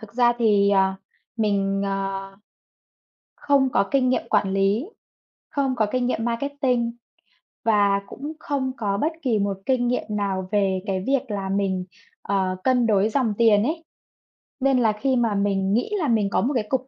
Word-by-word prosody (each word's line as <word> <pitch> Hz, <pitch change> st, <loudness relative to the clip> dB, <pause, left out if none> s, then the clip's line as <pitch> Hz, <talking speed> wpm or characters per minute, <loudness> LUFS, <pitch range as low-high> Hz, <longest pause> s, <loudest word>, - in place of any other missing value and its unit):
thực 220 Hz, 0 st, -13 dB
ra 240 Hz, -1 st, +4 dB
thì, 205 Hz, -3 st, +3 dB
ờ, 190 Hz, -1 st, +3 dB, 0.4 s
mình, 200 Hz, -2 st, 0 dB
ờ, 195 Hz, 0 st, -3 dB, 1.0 s
không 275 Hz, -2 st, +2 dB
có 200 Hz, 0 st, +2 dB
kinh 265 Hz, -2 st, +2 dB
nghiệm 255 Hz, -, +1 dB
quản 200 Hz, -2 st, +2 dB
lý, 200 Hz, -, +1 dB, 0.6 s
không 270 Hz, -2 st, -1 dB
có 220 Hz, -3 st, +2 dB
kinh 255 Hz, -1 st, 0 dB
nghiệm 225 Hz, -2 st, -1 dB
marketing 250 Hz, -1 st, -1 dB, 0.7 s
và 200 Hz, -2 st, +3 dB
cũng 295 Hz, +4 st, -7 dB
không 265 Hz, -3 st, -2 dB
có 200 Hz, -3 st, -1 dB
bất 310 Hz, +9 st, 0 dB
kỳ 230 Hz, -6 st, +1 dB
một 200 Hz, -1 st, -1 dB
kinh 250 Hz, -2 st, +1 dB
nghiệm 250 Hz, -, 0 dB
nào 195 Hz, -3 st, -2 dB
về 195 Hz, -2 st, +1 dB
cái 190 Hz, -2 st, -2 dB
việc 270 Hz, -4 st, 0 dB
là 195 Hz, -2 st, -3 dB
mình, 190 Hz, -2 st, -1 dB, 0.4 s
ờ, 190 Hz, -2 st, -1 dB
cân 250 Hz, -2 st, +3 dB
đối 210 Hz, 0 st, +3 dB
dòng 230 Hz, -3 st, 0 dB
tiền 220 Hz, -3 st, +4 dB
ấy. 320 Hz, +6 st, -2 dB, 0.8 s
Nên 270 Hz, -1 st, +3 dB
là 225 Hz, -3 st, +3 dB
khi 260 Hz, +5 st, 0 dB
mà 230 Hz, -4 st, +1 dB
mình 200 Hz, -1 st, 0 dB
nghĩ 245 Hz, -, 0 dB
là 305 Hz, -, 0 dB
mình 215 Hz, -4 st, +2 dB
có -, -, +1 dB
một 275 Hz, +5 st, 0 dB
cái 225 Hz, -4 st, 0 dB
cục 260 Hz, 0 st, -1 dB
215 Hz, 180 wpm, -23 LUFS, 200-255 Hz, 1.0 s, ra